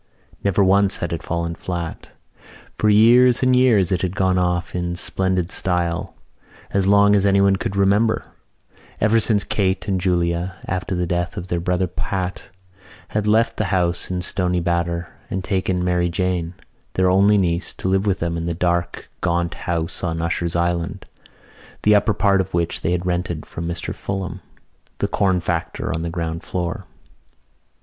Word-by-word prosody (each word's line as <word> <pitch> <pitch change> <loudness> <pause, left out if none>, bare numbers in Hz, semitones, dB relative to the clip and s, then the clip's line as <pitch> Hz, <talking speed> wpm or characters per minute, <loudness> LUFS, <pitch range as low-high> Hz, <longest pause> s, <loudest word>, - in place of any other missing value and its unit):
Never 100 0 +3
once 100 +1 +3
had 85 - -3
it 85 - -3
fallen 85 0 -2
flat. 85 -1 -5 0.7
For 110 - +3
years 120 +4 +6
and 130 0 +4
years 115 -7 +4
it 90 -2 +1
had 95 0 -2
gone 95 -1 +2
off 90 0 -1
in 85 -1 -2
splendid 95 0 -1
style 90 -1 -1 0.6
as 100 -1 +1
long 100 +1 +5
as 100 - +3
anyone 100 0 +4
could 95 - -4
remember; 100 +3 +2 0.7
ever 110 +2 +3
since 105 -2 +3
Kate 95 0 -1
and 95 -2 0
Julia, 90 0 0
after 95 0 -2
the 90 0 0
death 85 +4 -2
of 90 -1 -6
their 85 - 0
brother 90 +2 0
Pat, 90 +1 -4 0.6
had 105 0 -1
left 110 +2 +2
the 110 - 0
house 90 -2 0
in 90 -1 -2
Stoney 90 0 0
Batter 85 0 -1 0.2
and 95 0 -3
taken 95 -2 -1
Mary 90 -1 +1
Jane, 90 -1 -2 0.4
their 95 0 +2
only 100 +2 +5
niece, 85 -2 0
to - - -4
live 95 +2 +1
with 95 -2 +2
them 85 -1 -2
in 85 0 -3
the 85 - -2
dark 85 0 -1
gaunt 85 -1 0
house 85 0 -3
on 80 -2 -1
Usher's 85 +1 -1
Island, 85 +3 -1 0.8
the 105 - +5
upper 105 +1 +3
part 100 -1 +3
of 95 -1 -5
which 85 -1 -1
they 80 - 0
had 90 0 -1
rented 90 -3 -2
from 85 0 -6
Mr 85 0 -4
Fulham, 95 -3 -5 0.6
the - - 0
corn 95 -2 +1
factor 85 -2 -2
on 80 - -3
the 85 - -3
ground 85 -1 -3
floor. 90 +1 -4
90 Hz, 170 wpm, -21 LUFS, 85-100 Hz, 0.8 s, years